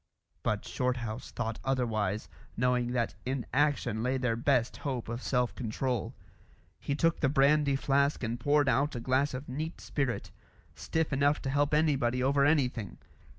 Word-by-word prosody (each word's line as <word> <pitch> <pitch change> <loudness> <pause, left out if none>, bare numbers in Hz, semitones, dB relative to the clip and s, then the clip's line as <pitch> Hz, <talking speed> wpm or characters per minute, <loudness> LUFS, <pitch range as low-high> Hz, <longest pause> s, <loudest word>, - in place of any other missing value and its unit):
But - - -1
Shorthouse 125 -2 -2
thought 115 -2 -4
otherwise, 110 -6 -1 0.3
knowing 125 0 +1
that 120 -2 0
in 130 -1 -2
action 135 -6 +1
lay 130 +3 0
their 125 -3 0
best 120 0 +1
hope 130 -5 -3
of 115 +2 -4
self 125 -2 0
control. 125 0 -2 0.6
He 140 - -2
took 165 +2 +2
the 135 - +2
brandy 140 0 +4
flask 140 +1 +1
and 115 +1 -2
poured 145 +2 +3
out 140 +2 +2
a - - -2
glass 130 +3 +1
of 130 +3 -6
neat 155 +6 -4
spirit, 135 -5 -2 0.4
stiff 160 -2 -2
enough 145 +2 +3
to 135 - -1
help 145 +1 +2
anybody 130 -5 +2
over 140 +1 +3
anything. 130 -8 +1
130 Hz, 155 wpm, -30 LUFS, 120-140 Hz, 0.6 s, brandy